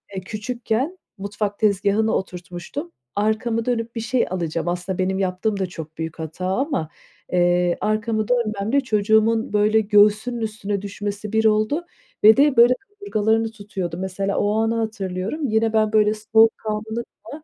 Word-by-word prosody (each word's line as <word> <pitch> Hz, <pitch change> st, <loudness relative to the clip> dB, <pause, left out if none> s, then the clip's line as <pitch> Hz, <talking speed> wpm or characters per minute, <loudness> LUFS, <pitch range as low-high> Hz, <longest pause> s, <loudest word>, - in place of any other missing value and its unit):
eee, 190 Hz, -, -3 dB
küçükken 235 Hz, -, -3 dB, 0.2 s
mutfak 205 Hz, +1 st, -3 dB
tezgahına 210 Hz, +1 st, +2 dB
oturtmuştum. 180 Hz, -, -5 dB, 0.2 s
Arkamı 220 Hz, +2 st, 0 dB
dönüp 235 Hz, -1 st, -2 dB
bir 230 Hz, -, -2 dB
şey 240 Hz, +2 st, +1 dB
alacağım. 170 Hz, -2 st, -3 dB
Aslında 180 Hz, +1 st, -2 dB
benim 190 Hz, +1 st, 0 dB
yaptığım 195 Hz, +2 st, -1 dB
da 190 Hz, -, +1 dB
çok 160 Hz, -3 st, -9 dB
büyük 160 Hz, 0 st, -5 dB
hata 160 Hz, +3 st, -5 dB
ama, 225 Hz, -, -1 dB, 0.4 s
eee, 175 Hz, 0 st, +2 dB
arkamı 215 Hz, 0 st, 0 dB
dönmemle 230 Hz, +1 st, +1 dB
çocuğumun 220 Hz, -1 st, +2 dB
böyle 210 Hz, +1 st, +4 dB
göğsünün 210 Hz, +3 st, +3 dB
üstüne 210 Hz, -2 st, -3 dB
düşmesi 205 Hz, +1 st, -5 dB
bir 220 Hz, 0 st, +2 dB
oldu 215 Hz, +10 st, +2 dB, 0.4 s
ve 220 Hz, +3 st, +8 dB
de 285 Hz, -2 st, +4 dB
böyle 240 Hz, +2 st, +7 dB
kaburgalarını 225 Hz, -, 0 dB
tutuyordu. 195 Hz, -5 st, -5 dB
Mesela 190 Hz, +1 st, -2 dB
o 205 Hz, 0 st, +1 dB
anı 225 Hz, +1 st, +1 dB
hatırlıyorum. 220 Hz, -, -3 dB
Yine 220 Hz, 0 st, +1 dB
ben 215 Hz, 0 st, +2 dB
böyle 210 Hz, -1 st, +4 dB
soğukkanlı 220 Hz, +1 st, +1 dB, 0.2 s
falan, 300 Hz, +1 st, -10 dB
215 Hz, 145 wpm, -22 LUFS, 195-225 Hz, 0.4 s, ve